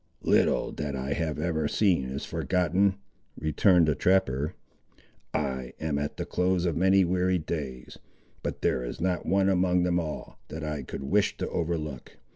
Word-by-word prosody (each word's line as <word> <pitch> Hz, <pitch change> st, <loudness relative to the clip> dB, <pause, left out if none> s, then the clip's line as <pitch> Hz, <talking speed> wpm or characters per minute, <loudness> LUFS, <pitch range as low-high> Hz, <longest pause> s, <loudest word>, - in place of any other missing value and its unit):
"Little -, -, +2 dB
that 70 Hz, -2 st, -4 dB
I 65 Hz, +2 st, -2 dB
have 80 Hz, 0 st, -2 dB
ever 80 Hz, -1 st, 0 dB
seen 90 Hz, -9 st, +2 dB
is 65 Hz, +1 st, -4 dB
forgotten," 95 Hz, +2 st, +1 dB, 0.4 s
returned 85 Hz, +2 st, +4 dB
the 75 Hz, -, +3 dB
trapper: 75 Hz, -5 st, +1 dB, 0.8 s
"I 65 Hz, -2 st, -2 dB
am 80 Hz, -2 st, -1 dB
at 75 Hz, 0 st, -3 dB
the -, -, -3 dB
close 90 Hz, 0 st, +1 dB
of 85 Hz, -4 st, 0 dB
many 95 Hz, +2 st, +4 dB
weary 90 Hz, +1 st, +1 dB
days, 70 Hz, -6 st, -5 dB, 0.4 s
but -, -, -5 dB
there 65 Hz, -, +1 dB
is -, -, -6 dB
not 90 Hz, 0 st, -1 dB
one 95 Hz, 0 st, +3 dB
among 90 Hz, -1 st, +3 dB
them 90 Hz, 0 st, +2 dB
all, 80 Hz, -3 st, -6 dB
that 80 Hz, +1 st, -6 dB
I 75 Hz, -2 st, -3 dB
could -, -, -7 dB
wish 100 Hz, +8 st, +1 dB
to -, -, -3 dB
overlook. 80 Hz, -6 st, -3 dB
80 Hz, 165 wpm, -28 LUFS, 75-90 Hz, 0.8 s, returned